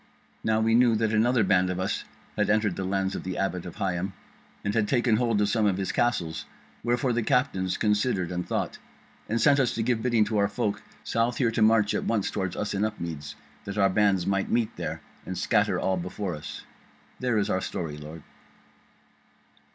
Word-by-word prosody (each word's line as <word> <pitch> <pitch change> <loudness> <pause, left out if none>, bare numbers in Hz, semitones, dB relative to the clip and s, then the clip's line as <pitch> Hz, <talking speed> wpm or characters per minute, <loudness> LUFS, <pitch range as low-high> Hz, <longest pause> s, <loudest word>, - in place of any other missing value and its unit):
Now 110 0 +2
we 115 0 +2
knew 120 -1 +5
that 110 0 +1
another 115 +2 +3
band 95 -1 +3
of 90 0 -2
us 95 +2 -2 0.3
had 105 - +1
entered 105 -3 +2
the 95 - -3
lands 95 0 0
of - - -4
the 95 -1 -4
Abbot 90 -2 -2
of 85 - -9
Higham, 95 0 -2 0.5
and 100 - -1
had 110 -1 +2
taken 120 -3 +2
hold 115 -3 +1
of 105 0 +2
some 110 -1 +2
of 95 -2 +1
his 95 -1 -1
castles; 90 -10 0 0.4
wherefore 120 +2 +1
the 120 - +1
captains 110 -8 +1
considered 105 -4 +1
and 90 0 -2
thought, - - -3 0.5
and 115 +2 +1
sent 140 +4 +5
us 130 -3 +1
to 115 - 0
give 115 -1 +1
bidding 120 -3 +3
to 105 -1 0
our 100 - +3
folk 100 0 -2 0.2
south 115 +1 0
here 120 -4 +2
to 115 - -1
march 110 -1 +4
at - - -1
once 110 -4 0
toward 95 -3 -2
us 105 - -2
in 100 +1 0
Upmeads, 80 -9 -4 0.3
that 100 +1 -5
our 100 -1 +4
bands 100 -3 +3
might 100 0 0
meet 115 -2 0
there, - - -4 0.2
and - - -5
scatter - - +2
all 95 -1 0
before 90 +1 -4
us. 75 - -7 0.6
There 125 -3 +1
is 105 0 +1
our 95 - +1
story, 80 -5 -4
lord." 75 +1 -9
105 Hz, 205 wpm, -27 LUFS, 95-115 Hz, 0.6 s, knew